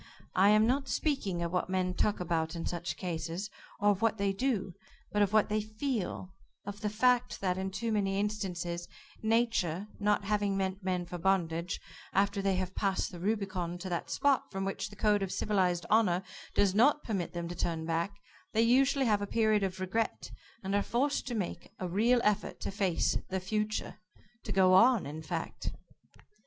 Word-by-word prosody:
I 195 +2 +5
am 215 +1 +5
not 270 +3 +1
speaking 205 - -1
of 170 +1 -3
what 180 - 0
men 185 -1 0
talk 210 +3 +1
about 165 -1 -1
in 165 - -4
such 175 0 -3
cases, 175 +3 -4 0.3
or 205 0 +4
of 200 +1 -2
what 225 -1 +2
they 200 -1 +1
do, 205 -5 -1 0.4
but 210 - +1
of 205 -1 +3
what 215 -1 +4
they 215 0 0
feel, 215 -4 -3 0.3
of 205 0 -7
the 210 - 0
fact 245 +3 +2
that, 185 -2 0
in 190 +1 -2
too 220 +4 -3
many 195 -2 +1
instances, 180 -5 -2 0.3
Nature 220 -5 +1
not 210 0 +2
having 205 -1 0
meant 190 0 -2
men 180 -1 -1
for 175 0 -6
bondage, 170 -2 0 0.3
after 200 +1 +2
they 195 -1 +1
have 185 0 -2
passed 195 -2 0
the 175 - -8
Rubicon 190 -3 -2
to 185 +1 -6
that 170 -1 -3
spot 280 -2 +1
from 195 -1 -3
which 195 - -3
the 205 - -13
code 210 -1 +2
of 195 -1 -2
civilized 185 -4 +1
honor 195 -5 +3 0.3
does 200 -2 +3
not 280 +8 +4
permit 195 -6 -2
them 170 -1 -3
to 175 - -5
turn 165 -2 -2
back, 165 +4 -1 0.4
they 225 - +3
usually 265 +3 +4
have 210 -3 +2
a 205 - -2
period 215 -1 +2
of 190 -1 -2
regret, 195 +5 -2 0.3
and 190 +1 -2
are 205 - +3
forced 270 +8 0
to 245 - -2
make 195 -5 -4
a 185 - -3
real 225 +7 +3
effort 210 -1 0
to - - -3
face 195 -4 +1
the 190 - -1
Future, 215 +3 -2 0.4
to - - -6
go 185 -1 +5
on, 230 +4 +6
in 150 +3 -6
fact." 160 - -4
195 Hz, 190 wpm, -31 LUFS, 180-215 Hz, 0.4 s, on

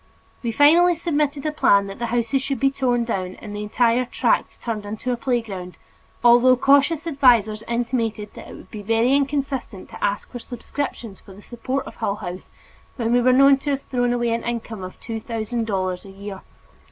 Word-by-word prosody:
We 235 - -2
finally 330 +7 +5
submitted 300 -3 -1
a 305 - +1
plan 200 -9 +4
that 195 +1 -8
the 235 - -2
houses 240 +3 0
should 270 0 -3
be 275 0 +3
torn 250 -3 0
down 185 -5 -3
and 205 -2 -9
the 205 - -4
entire 235 +3 +2
tract - - 0
turned 225 -3 -3
into 215 +4 -4
a - - +1
playground, 225 -8 -3 0.5
although 245 +1 +6
cautious 280 +5 +3
advisers 240 -8 +3
intimated 230 -3 -2
that - - -11
it - - -10
would - - -14
be 210 - -7
very 225 +5 +2
inconsistent 275 -7 -2
to - - -9
ask 200 0 -1
for 245 - -6
subscriptions 240 -3 -6
for 195 - -14
the 205 - -14
support 255 +3 -4
of - - -11
Hull 200 -3 -1
House 185 -3 -7 0.5
when 235 -2 -1
we 245 - +4
were 255 +1 +4
known 275 +2 +6
to 280 +2 -5
have 275 -1 -1
thrown 245 -1 0
away 240 -1 0
an 230 0 0
income 230 -4 -4
of 185 - -9
two 225 -1 -5
thousand 230 0 -3
dollars 185 -3 -2
a 195 - -12
year. 195 0 -8
240 Hz, 200 wpm, -22 LUFS, 210-270 Hz, 0.5 s, although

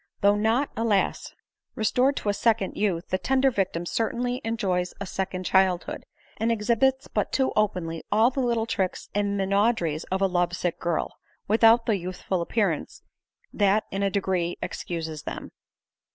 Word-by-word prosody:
Though 200 0 +5
not, 225 +7 +1
alas! 220 -3 0 0.4
restored 250 +5 +2
to 210 - -2
a - - +2
second 215 -1 +1
youth, 190 -5 -1
the 185 - 0
tender 265 +3 +2
victim 185 -5 -1
certainly 245 +5 -1
enjoys 190 -6 -1
a 200 - -4
second 185 0 -3
childhood, 185 -2 +1 0.3
and 225 +1 +1
exhibits 235 +5 +1
but - - -1
too 265 -1 +1
openly 175 -6 0
all 225 +4 +4
the 270 - -3
little 235 -3 +1
tricks 190 -5 -2
and 200 0 0
minau 200 +4 +3
deries 160 -4 -2
of 190 - -2
a 195 - +3
lovesick 175 -1 -1
girl, 170 -2 -2 0.3
without 225 +2 +5
the 215 -3 +2
youthful 185 0 -3
appearance 185 -3 -1 0.5
that 205 +1 +3
in 195 - -2
a 200 - +2
degree 185 -3 -1
excuses 160 -3 -5
them. - - -7
200 Hz, 155 wpm, -26 LUFS, 180-230 Hz, 0.5 s, Though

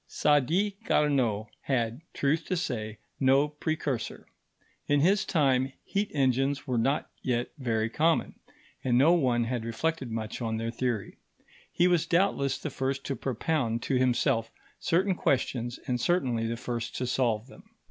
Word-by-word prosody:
Sadi 165 +8 +2
Carnot 130 - +2 0.2
had, 120 -1 -1
truth 150 +4 0
to 185 - -1
say, 110 -9 -3 0.2
no 135 +2 +4
precursor. 150 -4 -3 0.6
In 145 -1 +3
his 190 +5 +3
time 135 -4 +2
heat 205 +1 -1
engines 135 +1 +1
were 125 -3 0
not 135 +6 0
yet 120 -1 -1
very 115 -4 0
common, 160 +7 +1 0.5
and 120 -2 +2
no 150 +7 +6
one 125 -8 +2
had 120 0 -2
reflected 130 +4 -2
much 110 +1 -4
on 110 -1 -1
their 115 +1 -2
theory. 120 -4 -2 0.5
He 175 - +3
was 175 -2 +2
doubtless 165 -7 +2
the 155 - -5
first 135 +1 -2
to 135 - -2
propound 125 -3 -1
to 130 - +1
himself 120 -2 +2 0.3
certain 185 +3 +2
questions, 125 -6 -1
and 125 -3 -1
certainly 125 -10 +1
the 115 +1 -3
first 120 -1 -4
to 125 - -2
solve 120 -3 0
them. 190 +11 -16
130 Hz, 150 wpm, -28 LUFS, 120-155 Hz, 0.6 s, no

